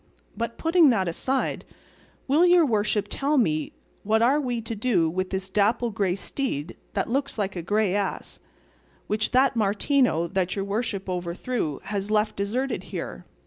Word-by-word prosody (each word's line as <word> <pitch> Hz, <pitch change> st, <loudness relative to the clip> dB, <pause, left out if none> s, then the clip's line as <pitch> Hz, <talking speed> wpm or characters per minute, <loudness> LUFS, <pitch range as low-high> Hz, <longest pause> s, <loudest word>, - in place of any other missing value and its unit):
But 230 Hz, 0 st, -4 dB
putting 330 Hz, -2 st, +5 dB
that 195 Hz, -7 st, +2 dB
aside, 260 Hz, +11 st, -1 dB, 0.6 s
will 295 Hz, +6 st, +4 dB
your 355 Hz, -2 st, +6 dB
worship 210 Hz, -4 st, +1 dB
tell 280 Hz, +8 st, 0 dB
me 155 Hz, -, +1 dB, 0.3 s
what 220 Hz, +2 st, +2 dB
are 275 Hz, +5 st, +4 dB
we 245 Hz, -3 st, -2 dB
to 230 Hz, 0 st, -5 dB
do 205 Hz, -7 st, +2 dB
with 185 Hz, +3 st, -2 dB
this 190 Hz, 0 st, -3 dB
dapple 220 Hz, +4 st, +1 dB
grey 200 Hz, -4 st, 0 dB
steed 190 Hz, -, -4 dB, 0.2 s
that -, -, -1 dB
looks 275 Hz, +2 st, -1 dB
like 200 Hz, -2 st, -2 dB
a 175 Hz, -, -3 dB
grey 205 Hz, +2 st, +1 dB
ass, 200 Hz, -1 st, -3 dB, 0.7 s
which 215 Hz, +1 st, 0 dB
that 265 Hz, +1 st, +3 dB
Martino 215 Hz, -, +2 dB
that 185 Hz, +1 st, -1 dB
your 195 Hz, -1 st, -2 dB
worship 200 Hz, -1 st, -2 dB
overthrew 180 Hz, -, -3 dB
has 200 Hz, -1 st, -3 dB
left 215 Hz, 0 st, +1 dB
deserted 240 Hz, +7 st, -2 dB
here? -, -, -6 dB
215 Hz, 160 wpm, -25 LUFS, 190-255 Hz, 0.7 s, your